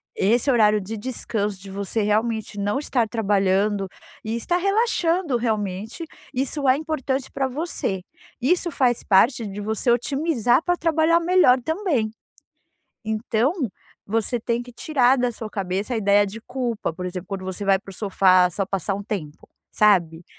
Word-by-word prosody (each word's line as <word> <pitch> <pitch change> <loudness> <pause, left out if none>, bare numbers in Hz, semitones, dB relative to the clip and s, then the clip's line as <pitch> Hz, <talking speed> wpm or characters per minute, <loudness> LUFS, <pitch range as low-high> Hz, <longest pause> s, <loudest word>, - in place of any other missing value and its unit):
Esse 235 +7 +2
horário 215 -3 +4
de 205 +3 -6
descanso, 210 -3 -3
de 195 +1 -10
você 200 +3 -2
realmente 215 0 -1
não 205 +3 0
estar 255 -5 0
trabalhando 200 -2 +1 0.4
e 220 +1 -3
estar 345 +9 0
relaxando, 365 - +1
realmente, 215 - -3 0.3
isso 275 +2 -1
é 255 - +5
importante 280 -4 -3
pra 270 -1 -1
você. 260 - -3 0.4
Isso 345 +7 +1
faz 250 -6 +1
parte 225 +3 +3
de 200 +1 -7
você 220 +4 -1
otimizar 255 +1 +2
pra 355 0 +1
trabalhar 325 0 +3
melhor 340 -7 +4
também. 320 - 0 0.9
Então, 220 +4 0 0.5
você 225 +3 -1
tem 235 +1 -1
que 245 0 -13
tirar 260 0 +2
da 245 0 +1
sua 225 -1 -7
cabeça 195 +4 -2
a - - 0
ideia 205 -1 +3
de 210 +3 -8
culpa, 245 -5 -3
por 180 +2 -6
exemplo, 180 0 -6
quando 195 -2 -5
você 190 +2 -5
vai 195 -1 +4
para 195 - -13
o - - -10
sofá 185 -2 +4
só 195 +3 -2
passar 195 +1 -2
um 200 - -5
tempo, 165 -8 -6 0.2
sabe. 175 -6 +3
225 Hz, 160 wpm, -23 LUFS, 200-265 Hz, 0.9 s, é